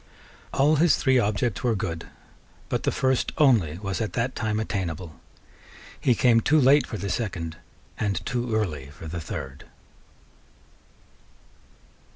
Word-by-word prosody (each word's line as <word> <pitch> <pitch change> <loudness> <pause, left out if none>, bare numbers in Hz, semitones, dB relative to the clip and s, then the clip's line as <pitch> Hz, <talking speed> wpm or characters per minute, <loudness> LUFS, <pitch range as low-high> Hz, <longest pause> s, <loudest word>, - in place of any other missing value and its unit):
All 150 +3 +3
his 165 +1 +5
three 130 -1 +3
objects 110 +4 0
were 120 -3 +2
good; 85 -4 -4 0.6
but - - -1
the - - 0
first 130 -1 0
only 115 - +3
was 100 +2 -3
at 110 - -3
that 125 +2 -1
time 110 -1 -1
attainable. 90 -6 -4 0.8
He 125 - +3
came 115 -2 +4
too 155 +7 +3
late 140 +2 +5
for 110 - -5
the 100 +1 -4
second, 85 -6 -3 0.4
and 100 -4 -1
too 120 -2 -1
early 75 -11 -2
for 75 +3 -12
the 80 +2 -5
third. 65 -2 -7
110 Hz, 140 wpm, -25 LUFS, 85-125 Hz, 0.8 s, his